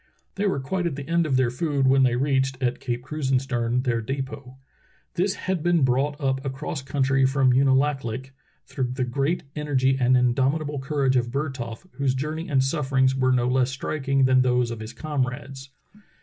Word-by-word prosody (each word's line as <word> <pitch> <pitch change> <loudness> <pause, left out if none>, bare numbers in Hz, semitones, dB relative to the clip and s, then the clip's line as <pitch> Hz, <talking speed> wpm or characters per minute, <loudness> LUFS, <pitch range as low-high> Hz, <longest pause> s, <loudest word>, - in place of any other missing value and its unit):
They 200 +1 -1
were 185 - 0
quite 175 +7 -2
at 155 - -3
the 140 -1 -7
end 170 0 +1
of 135 -3 +1
their 130 -2 +2
food 140 0 0
when 135 +1 +4
they 125 -2 +3
reached, 135 0 +1
at 125 -2 -1
Cape 120 -1 -3
Krusenstern, 130 -4 -1
their 120 -3 0
depot. 130 +1 -6 0.6
This 190 +2 0
had 185 -4 -2
been 175 -2 +2
brought 135 +3 +1
up 135 -1 -1
across 135 +1 -4
country 135 0 +1
from 135 -1 +3
Unalaklik 135 -1 +1 0.3
through 125 -2 -3
the 130 0 -1
great 140 +7 -1
energy 135 -3 +1
and 130 0 +4
indomitable 135 +4 +1
courage 135 -1 +1
of 120 -1 0
Bertholf, 130 -1 -4
whose 135 -2 +1
jour 150 +4 -2
ney 160 +2 -6
and 135 -3 +3
sufferings 135 -2 +1
were 130 -1 +2
no 125 -1 +2
less 130 0 +2
striking 135 0 0
than 130 0 +4
those 125 -1 +1
of 115 - -6
his 110 +1 -7
comrades. 135 -2 -4
135 Hz, 180 wpm, -24 LUFS, 130-145 Hz, 0.6 s, when